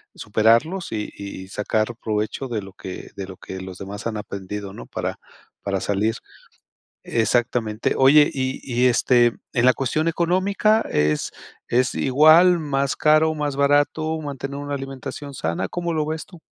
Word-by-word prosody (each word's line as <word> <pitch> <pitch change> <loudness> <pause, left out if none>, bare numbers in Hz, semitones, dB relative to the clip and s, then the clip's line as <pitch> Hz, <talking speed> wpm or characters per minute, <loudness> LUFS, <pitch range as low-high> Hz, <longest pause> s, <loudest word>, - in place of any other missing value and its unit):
superarlos 115 - +1
y 105 -1 -3
y 100 -1 -8
sacar 110 +3 -1
provecho 110 +5 -2
de 115 -4 -3
lo 95 0 -11
que 95 -1 -8
de 95 -1 -5
lo 95 - -9
que 95 +1 -8
los 95 -1 -8
demás 100 +4 -6
han 115 - -3
aprendido, 100 0 -6
¿no?, - - -9
para - - -4 0.4
para 100 -1 -2
salir. 105 +3 0 0.9
Exactamente. 115 -1 0
Oye, 145 +3 +6
y 130 -1 -2
y, 125 -1 0
este, 120 -1 +4 0.2
en 120 -1 +2
la 130 - +6
cuestión 145 +5 -1
económica, 190 +6 +2
¿es 75 0 0 0.4
es 125 +1 +1
igual, 155 +6 +6
más 140 -3 -1
caro, 155 +1 +4
más 145 -2 -2
barato, 145 +3 +2
mantener 140 -1 -5
una 145 0 -5
alimentación 135 +1 -7
sana? 85 -9 -2
¿Cómo 175 -1 -3
lo 155 -1 0
ves 160 +1 -4
tú? 175 -4 -15
130 Hz, 155 wpm, -22 LUFS, 105-150 Hz, 0.9 s, Oye